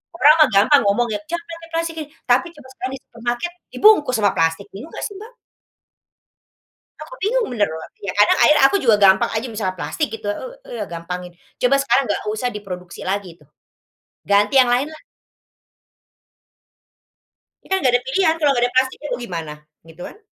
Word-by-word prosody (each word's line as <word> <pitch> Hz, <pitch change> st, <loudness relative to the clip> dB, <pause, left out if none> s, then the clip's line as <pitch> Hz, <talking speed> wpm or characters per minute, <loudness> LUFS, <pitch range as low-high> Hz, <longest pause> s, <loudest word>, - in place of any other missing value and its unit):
orang 300 Hz, -2 st, +6 dB
mah 305 Hz, -3 st, +6 dB
gampang 245 Hz, +9 st, +5 dB
ngomong 235 Hz, +4 st, +2 dB
ya, 210 Hz, -, -2 dB
"Jangan 340 Hz, 0 st, -4 dB
pakai 330 Hz, 0 st, -14 dB
plastik 330 Hz, 0 st, -2 dB
ih!" 295 Hz, -, -16 dB, 0.2 s
tapi 250 Hz, +8 st, +3 dB
coba 290 Hz, -3 st, -15 dB
sekarang 260 Hz, 0 st, -6 dB
di -, -, -10 dB
supermarket, 240 Hz, +8 st, -4 dB, 0.2 s
dibungkus 405 Hz, -12 st, +4 dB
sama 205 Hz, -2 st, +3 dB
plastik, 165 Hz, +4 st, 0 dB
bingung 250 Hz, +12 st, -10 dB
gak -, -, -6 dB
sih, 405 Hz, -, -12 dB
Mbak? 445 Hz, +4 st, -12 dB, 1.7 s
Aku -, -, -13 dB
bingung 455 Hz, +4 st, +1 dB
bener, 210 Hz, -6 st, +1 dB
Mbak, 160 Hz, 0 st, -8 dB
ya 200 Hz, -, -3 dB
karena 205 Hz, 0 st, +5 dB
akhirnya 300 Hz, -2 st, +5 dB
aku 400 Hz, -, +1 dB
juga 225 Hz, -4 st, +4 dB
gampang 195 Hz, -1 st, +4 dB
aja 225 Hz, +3 st, -3 dB
misalnya 190 Hz, -4 st, -3 dB
plastik 300 Hz, -, -3 dB
gitu, 215 Hz, -, -9 dB
eee -, -, -9 dB
eee, -, -, 0 dB
gampangin. 175 Hz, +1 st, -6 dB, 0.3 s
Coba 255 Hz, +2 st, +4 dB
sekarang 275 Hz, -3 st, +1 dB
nggak -, -, -1 dB
usah 245 Hz, +3 st, -2 dB
diproduksi 180 Hz, -5 st, -8 dB
lagi 190 Hz, -3 st, -3 dB
itu, 150 Hz, -, -23 dB, 0.8 s
ganti 205 Hz, +5 st, +3 dB
yang 255 Hz, -2 st, +5 dB
lain 265 Hz, +5 st, 0 dB
lah. 315 Hz, 0 st, -13 dB, 2.6 s
Ini -, -, -19 dB
kan -, -, +3 dB
gak 255 Hz, -3 st, +2 dB
ada -, -, -10 dB
pilihan, 320 Hz, +4 st, +2 dB
kalau 300 Hz, -3 st, +2 dB
gak 240 Hz, -2 st, +1 dB
ada -, -, -18 dB
plastik 260 Hz, 0 st, +2 dB
ya 295 Hz, -, -6 dB
mau -, -, -4 dB
gimana? 165 Hz, -9 st, -5 dB, 0.3 s
Gitu 165 Hz, +2 st, -15 dB
kan. -, -, -11 dB
245 Hz, 185 wpm, -20 LUFS, 200-300 Hz, 2.6 s, orang